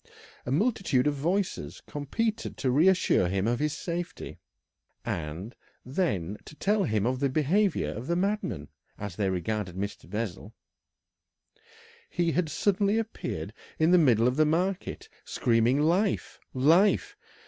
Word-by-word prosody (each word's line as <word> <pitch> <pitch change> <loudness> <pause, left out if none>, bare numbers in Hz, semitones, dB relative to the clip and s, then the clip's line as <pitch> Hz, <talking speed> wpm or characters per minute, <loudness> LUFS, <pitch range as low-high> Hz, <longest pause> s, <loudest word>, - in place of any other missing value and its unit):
A - - -1
multitude 185 - +2
of 150 - +2
voices 145 - -2
competed 220 - -3
to 130 - 0
reassure 175 - +4
him 95 +2 0
of 120 +1 +1
his 150 0 0
safety, 175 +2 -5 0.7
and 85 +8 -4 0.3
then 105 - -1
to 155 - -12
tell 205 +4 +1
him 105 -1 0
of 125 +1 0
the 140 0 +1
behaviour 160 +7 +1
of 115 +5 -6
the 170 - +1
madman, 185 - -1 0.3
as 100 -4 -6
they 100 -1 0
regarded 95 +1 -2
Mr. 100 -1 -5
Bessel. 105 0 -5 1.5
He 175 -1 0
had 170 -1 0
suddenly 200 +6 +1
appeared 225 0 -4 0.2
in 160 +2 +3
the 180 - +7
middle 120 -7 +4
of 125 +2 0
the 155 - +5
market 180 +4 -1 0.2
screaming 120 +3 +2
"Life! 180 +7 +1
Life!" 180 - +3
145 Hz, 135 wpm, -28 LUFS, 110-185 Hz, 1.5 s, the